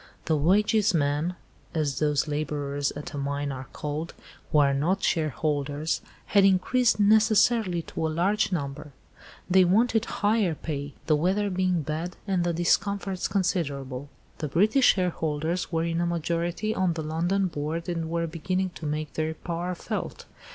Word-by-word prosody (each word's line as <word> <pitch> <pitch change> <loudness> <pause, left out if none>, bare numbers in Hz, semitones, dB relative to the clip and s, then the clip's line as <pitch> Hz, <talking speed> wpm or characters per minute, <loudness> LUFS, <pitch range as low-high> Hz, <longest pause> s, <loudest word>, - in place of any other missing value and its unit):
The 160 - +2
'wages 205 +6 +3
men'—as 150 -1 -2
those 150 -1 +1
labourers 145 -1 -2
at 145 +1 -7
a 145 - -4
mine 140 +1 -2
are 130 0 -7
called, 150 +3 -4 0.4
who - - +3
are 140 -2 +5
not 170 +8 0
shareholders—had 155 +4 0
increased 215 +6 +3
necessarily 215 -3 +4
to 160 - -3
a - - -2
large 190 +7 +1
number; 145 -3 -4 0.5
they 185 0 +5
wanted 225 +5 +3
higher 205 -5 +1
pay, 145 -2 -5
the 155 - +3
weather 195 +6 +1
being 185 -3 +1
bad 160 +4 -4
and 185 -3 +1
the 175 - +1
discomforts 190 +3 0
considerable. 145 -8 -2 0.3
The 155 - -2
British 215 - +4
shareholders 165 -2 -1
were 165 -1 0
in 170 0 -1
a 175 - +1
majority 170 +5 -1
on 185 -4 +1
the 160 -1 -4
London 175 +5 0
Board 160 0 -3
and 165 -2 -2
were 170 0 0
beginning 185 +3 -2
to 155 - -3
make 150 -1 -3
their 160 0 -2
power 175 +2 -4
felt. - - -5
165 Hz, 150 wpm, -26 LUFS, 150-185 Hz, 0.5 s, are